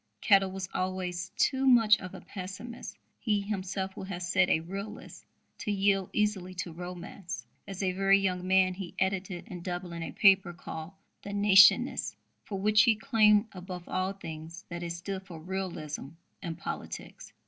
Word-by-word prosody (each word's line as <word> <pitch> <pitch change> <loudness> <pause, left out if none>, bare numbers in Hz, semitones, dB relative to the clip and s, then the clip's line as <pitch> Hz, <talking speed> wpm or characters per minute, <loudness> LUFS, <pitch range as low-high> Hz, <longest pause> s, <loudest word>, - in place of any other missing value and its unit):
Kettle 195 -2 +4
was 190 -1 -4
always 185 -1 -2
too 270 -1 +2
much 225 -4 +6
of 185 -2 -8
a - - -9
pessimist 205 +5 -8 0.2
he 210 -3 +1
himself 195 -1 -3
would 190 - -7
have 180 -2 -5
said 175 +1 +3
a 160 - +3
realist 200 +6 -7 0.4
to 210 - -2
yield 195 -1 +2
easily 195 -4 0
to 175 -1 -4
romance. 180 +1 -7 0.2
As 195 0 -5
a 185 - +2
very 195 +1 +4
young 185 -2 -1
man 185 0 +4
he 185 -2 -7
edited 190 -1 -2
in 175 -1 -7
Dublin 175 -1 -5
a 165 - -4
paper 195 -3 +5
called 160 0 -7 0.3
The 200 - -7
Nationist, 200 -1 +5 0.3
for 195 -2 -4
which 210 +2 +5
he 230 -3 +5
claimed, 215 -2 +4
above 180 -1 -8
all 185 +1 -1
things, 165 -1 -9
that 170 0 -5
it 170 -1 -3
stood 190 +3 -5
for 170 -4 -9
"realism" 170 -5 -4 0.3
in 165 -2 -4
politics. 170 - -7
190 Hz, 165 wpm, -30 LUFS, 180-200 Hz, 0.4 s, much